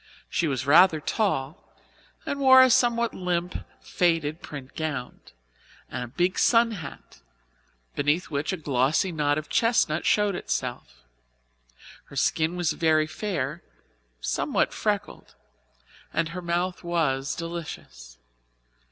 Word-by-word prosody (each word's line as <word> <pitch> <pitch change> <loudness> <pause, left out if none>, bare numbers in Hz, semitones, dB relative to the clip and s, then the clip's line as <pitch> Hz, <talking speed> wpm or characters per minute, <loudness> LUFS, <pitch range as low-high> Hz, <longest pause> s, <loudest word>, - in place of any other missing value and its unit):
She 170 - +1
was 135 -2 -2
rather 160 +3 +6
tall, 155 -4 -2 0.5
and 285 - -3
wore 260 -1 +8
a 260 - +4
somewhat 235 -1 +2
limp, 180 -1 -2 0.2
faded 165 -3 0
print 140 -3 -9
gown, 150 -6 -4 0.7
and - - -3
a - - -6
big 175 +9 0
sunhat, 225 - 0 0.7
beneath 150 +5 0
which 145 +4 -1
a 190 - -2
glossy 150 +5 +1
knot 145 -2 +1
of 155 -1 -4
chestnut 225 -9 +2
showed 210 -1 +3
itself. 120 - -4 1.0
Her - - -14
skin 160 +4 +1
was 175 -2 0
very 155 -2 +2
fair, 190 +4 -3 0.6
somewhat - - 0
freckled, - - -3 0.8
and 165 0 0
her 180 +2 -6
mouth 175 +2 -2
was 145 -6 0
delicious. 155 - -8
165 Hz, 115 wpm, -26 LUFS, 145-180 Hz, 1.0 s, wore